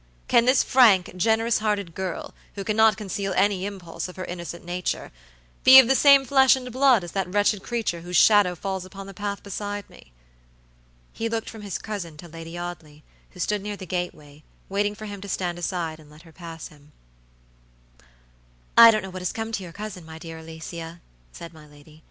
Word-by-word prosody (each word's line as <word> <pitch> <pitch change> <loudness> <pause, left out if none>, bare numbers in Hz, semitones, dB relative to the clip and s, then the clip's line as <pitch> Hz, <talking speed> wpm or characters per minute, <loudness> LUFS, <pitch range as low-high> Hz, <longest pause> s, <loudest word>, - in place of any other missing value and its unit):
Can 235 0 +4
this 255 +1 +4
frank, 210 -9 +4
generous 225 +5 +1
hearted 205 -5 -2
girl, 185 -2 -5 0.2
who 200 - -5
cannot 215 0 +3
conceal 200 -2 -4
any 200 -1 +2
impulse 185 -5 -7
of 180 - -11
her 185 - -6
innocent 170 -1 -7
nature, 180 +1 -3 0.5
be 260 +1 +10
of 265 -3 +9
the 265 - +4
same 275 0 +6
flesh 265 0 +5
and 250 -1 -7
blood 255 -4 +4
as 175 - -8
that 195 -2 -2
wretched 205 0 +2
creature 220 -8 -3
whose 175 +1 -2
shadow 205 -4 +5
falls 190 +1 -4
upon 195 +1 -10
the 195 - -10
path 200 +1 -5
beside 205 0 -5
me!" - - -17 1.0
He 230 0 -3
looked 225 -1 -3
from 220 - -10
his 200 -3 -4
cousin 185 -8 -7
to 175 - -11
Lady 165 +1 -9
Audley, 160 -4 -8 0.3
who 180 - -16
stood 210 +3 -1
near 205 0 -5
the 190 - -8
gateway, 155 -5 -5 0.3
waiting 205 +1 0
for 215 +1 -9
him 200 -2 -8
to 200 - -8
stand 175 -2 -2
aside 170 -3 -3
and 150 -1 -17
let 150 +2 -16
her 165 - -17
pass 165 -2 -9
him. 150 0 -21 1.8
"I 230 0 +10
don't 215 -2 +2
know 190 - -7
what 185 0 -7
has 180 - -2
come 225 0 -5
to 210 - -3
your 180 -2 -9
cousin, 205 -1 -8
my 160 0 -11
dear 165 0 -9
Alicia," 165 +1 -9 0.3
said 170 - -10
my 155 -1 -15
lady. 150 +1 -18
190 Hz, 200 wpm, -24 LUFS, 170-215 Hz, 1.8 s, be